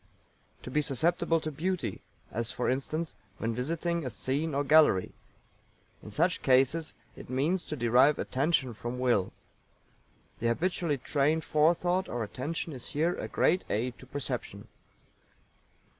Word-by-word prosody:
To 125 - -7
be 150 - +2
susceptible 165 +4 +2
to 155 - -3
beauty, 180 +5 -2 0.3
as, 115 +1 -2
for 125 - 0
instance, 155 +5 -3 0.2
when 115 +1 -2
visiting 165 +7 -1
a 130 - -3
scene 140 +6 -2
or 140 - +1
gallery. 150 -10 +5 0.9
In - - -10
such 165 - +1
cases 135 +5 +2 0.2
it - - -11
means 150 +8 +1
to 150 - -4
derive 125 +3 +4
Attention 135 -2 0
from 120 +3 -5
Will. 120 -7 +1 1.1
The 115 - 0
habitually 165 +4 0
trained 150 +4 +1
Forethought 175 +5 +2
or 120 -2 -2
Attention 145 +9 -4
is 125 -3 -8
here 165 +4 +1
a - - -5
great 180 +4 +2
aid 120 +3 -2
to 130 - -13
perception. 140 +1 -4
145 Hz, 140 wpm, -30 LUFS, 125-165 Hz, 1.1 s, gallery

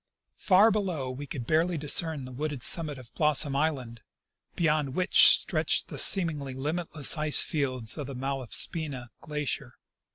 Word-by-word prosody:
Far 205 +4 +4
below 180 -11 -3
we 140 +3 -8
could 130 -3 -7
barely 165 +5 0
discern 150 -1 +1
the 130 - -10
wooded 145 0 -5
summit 155 -4 +2
of 125 -2 -14
Blossom 150 -2 +2
island, 135 -6 -3 0.5
beyond 150 -5 -1
which 185 +1 +5
stretched - - -1
the - - -5
seem 185 -4 +5
ingly 140 -4 -7
limitless 155 +1 -1
ice 155 -1 +3
fields 130 -4 -2
of 145 - -6
the 140 - -8
Malaspina 135 +1 -5
glacier. 150 -4 -5
150 Hz, 150 wpm, -27 LUFS, 130-160 Hz, 0.5 s, which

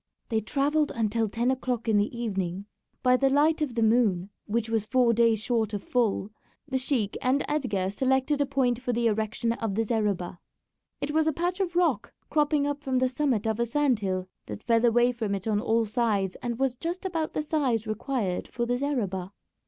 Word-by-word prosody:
They 220 -2 +1
travelled 290 +6 +1
until 225 -1 0
ten 235 +5 0
o'clock 250 -3 -2
in 220 -2 +3
the 210 +4 0
evening. 195 -4 -2 0.4
By 250 0 +5
the 270 +1 +3
light 305 +3 +3
of 270 -6 -1
the 230 - +2
moon, 210 -5 +2 0.2
which 225 +1 0
was 225 -2 -1
four 250 -2 +3
days 230 -1 +3
short 225 -2 0
of 200 - -5
full, 220 -4 0 0.4
the 260 0 -1
sheik 255 -6 0
and 260 +3 +1
Edgar 210 -11 -1
selected 265 +5 +1
a 285 - +1
point 260 -3 +1
for 245 -1 -1
the 235 0 0
erection 220 +1 0
of 225 -4 -3
the 225 - +1
zareba. 205 -6 -1 0.6
It 290 - -2
was 315 +1 +2
a - - +4
patch 350 +4 -2
of 355 -3 -1
rock 355 -1 +1 0.2
cropping 295 -1 +2
up 290 0 -2
from 265 -3 -1
the 255 0 +2
summit 255 -5 0
of 220 0 -1
a 235 - +2
sand 270 -2 +2
hill 185 -2 -2 0.2
that - - -7
fell 230 -1 +2
away 240 +1 +4
from 220 -4 -2
it 195 - -6
on 210 -2 +2
all 225 +1 +2
sides, 210 -4 0
and 240 -2 -3
was 265 -1 0
just 340 +8 -4
about 330 -4 -2
the 305 - -1
size 270 -8 0
required 215 -3 -2
for 240 - -3
the 245 +1 -1
zareba. 200 -10 -2
235 Hz, 205 wpm, -27 LUFS, 215-275 Hz, 0.6 s, By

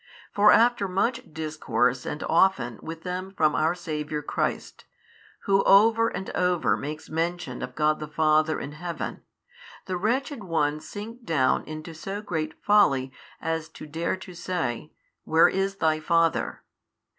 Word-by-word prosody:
For 210 +1 +6
after 235 -3 +4
much 230 +6 -1
discourse 150 -5 -1
and 150 - -4
often 160 - +2
with 165 0 -8
them 185 +1 -5
from 155 -1 +3
our 160 +3 +1
Saviour 150 -3 -4
Christ, - - -3 0.6
Who 195 0 +3
over 225 +3 +6
and 190 - -5
over 180 -2 +1
makes 150 +2 -6
mention 165 -5 -3
of 125 0 -6
God 155 0 +2
the 150 - -5
Father 155 +1 +2
in 140 - -6
Heaven, 165 0 -5 0.6
the 185 - -2
wretched 245 - -1
ones 155 -4 -1
sink 225 +4 -8
down 140 - +2
into 155 +1 -7
so 195 +5 -5
great 160 -6 -3
folly 140 -11 +4 0.3
as 165 0 -3
to 160 - -11
dare 160 +4 -2
to 185 -1 -11
say, 165 -6 -3 0.3
Where 160 +1 +5
is 195 +1 -1
Thy 160 -4 +1
Father? 165 +1 +1
165 Hz, 145 wpm, -26 LUFS, 155-195 Hz, 0.6 s, For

